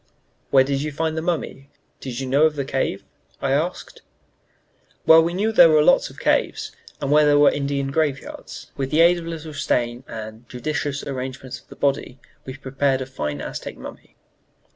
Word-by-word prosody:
"Where 135 -1 +6
did 135 0 -1
you 150 +1 -3
find 160 +2 -2
the 160 - -2
mummy? 160 -5 -3 0.3
Did 125 -2 -6
you 135 - -3
know 140 +4 +3
of 155 - -5
the 140 -2 -2
cave?" 130 -7 -2 0.4
I 135 - -1
asked. 160 +6 -2 1.0
"Well, 160 0 +8
we 170 +2 -1
knew 210 +4 +1
where - - -3
there 170 -4 +8
were 155 -1 +5
lots - - +4
of - - -15
caves, - - 0 0.3
and 140 -1 -2
where 150 +1 +6
there 145 -1 +4
were 145 0 +6
Indian 140 -1 -2
graveyards. 145 -3 -3
With 135 -1 -3
the 155 +3 +3
aid 175 +1 +5
of 165 - -8
a - - -4
little 160 -2 -7
stain 120 -3 -1
and 110 +1 -9
judicious 140 +2 -3
arrangement 130 -1 -6
of - - -34
a - - -10
body 140 -2 -1 0.3
we 130 0 -7
prepared 135 0 0
a - - -3
fine 75 - -4
Aztec - - -6
mummy. - - -11
140 Hz, 195 wpm, -22 LUFS, 130-155 Hz, 1.0 s, Well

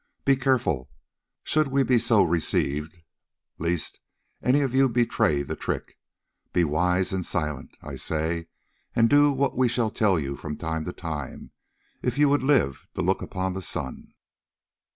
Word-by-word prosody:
Be 135 - +5
careful, 130 - 0 0.5
should 155 -1 +2
we 135 0 +2
be 125 -2 +3
so 110 -3 +4
received, 80 -1 0 0.6
lest 85 -1 -1 0.4
any 135 +3 +3
of 135 -3 -1
you 135 0 +4
betray 115 -10 +1
the - - -5
trick. - - -5 0.5
Be 90 - +3
wise 90 +5 +1
and 95 -1 -1
silent, 75 -6 -3
I - - -7
say, 80 +1 -1 0.5
and 115 -1 +5
do 145 0 +6
what 135 0 0
we 130 -1 +3
shall 120 -2 0
tell 100 -6 +2
you 70 -1 -3
from 75 +2 -6
time 80 -1 -3
to 90 - -3
time, 80 -6 -6 0.5
if 125 +1 -1
you 145 -1 +5
would 145 -1 +3
live 130 - +1
to - - -1
look - - +1
upon 95 0 -3
the 95 - -4
sun." 70 -7 -5
95 Hz, 160 wpm, -25 LUFS, 80-130 Hz, 0.6 s, do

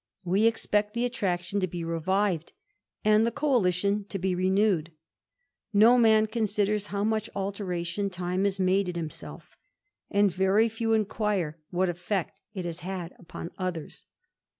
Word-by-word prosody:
We 195 +5 +4
the 210 +1 0
attraction 190 -4 -1
to 185 - 0
be 175 -1 -5
revived, 170 +1 0 0.5
and 215 +1 +5
the 230 - +2
coalition 200 - +1
to 195 - -5
be 190 0 0
d; 190 -1 +2 0.9
no 225 +4 +7
man 220 -2 +5
considers 210 -2 0
how 200 0 -2
much 220 0 0
alteration 195 -1 -2
time 180 +1 -2
has 195 -1 0
n 185 - +2 0.3
himself, 160 -3 -7 0.5
and 200 -1 +3
very 190 +5 +3
few 225 0 -1
inquire 205 -6 0
what 185 +1 +1
effect 175 +2 -2 0.2
it 185 -2 -4
has 170 0 -5
had 180 -1 -5 0.2
Dthers. 175 -2 -6
195 Hz, 130 wpm, -28 LUFS, 180-210 Hz, 0.9 s, no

